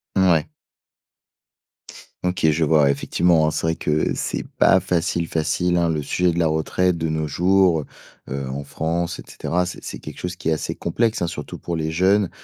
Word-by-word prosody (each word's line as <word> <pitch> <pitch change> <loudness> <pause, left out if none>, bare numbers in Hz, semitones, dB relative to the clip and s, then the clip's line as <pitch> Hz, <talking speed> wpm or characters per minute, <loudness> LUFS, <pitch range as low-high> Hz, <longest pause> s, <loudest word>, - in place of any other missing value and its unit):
Mouais. 85 -5 +3 1.7
OK. 90 -2 +1
Je 80 +1 +1
vois, 75 0 +4
ouais, 70 - +4
effectivement 80 +3 +2
hein, - - +1
c'est - - -2
vrai 80 - +1
que 75 0 0
c'est - - -3
pas 95 - +5
facile, 85 -2 0
facile, 90 +2 0
hein, 85 - +2
le 75 -2 -1
sujet 90 +4 +1
de 85 - -2
la 85 - +3
retraite 85 +3 +1
de 80 0 -1
nos 80 -1 -1
jours, 90 +1 +3
heu, 75 - -6 0.6
heu, 65 - -5
en 70 +2 -5
France 85 +4 -2
et - - -8
cetera. 90 +1 -2
C'est 90 - -7
c'est - - -6
quelque - - -9
chose 90 0 -4
qui 80 -2 -3
est - - +2
assez 80 - -2
complexe, 110 +6 0
hein, 85 - +1
surtout 80 -3 -6
pour 85 -1 -4
les 80 0 -2
jeunes, 95 +3 +3
85 Hz, 205 wpm, -22 LUFS, 80-90 Hz, 1.7 s, pas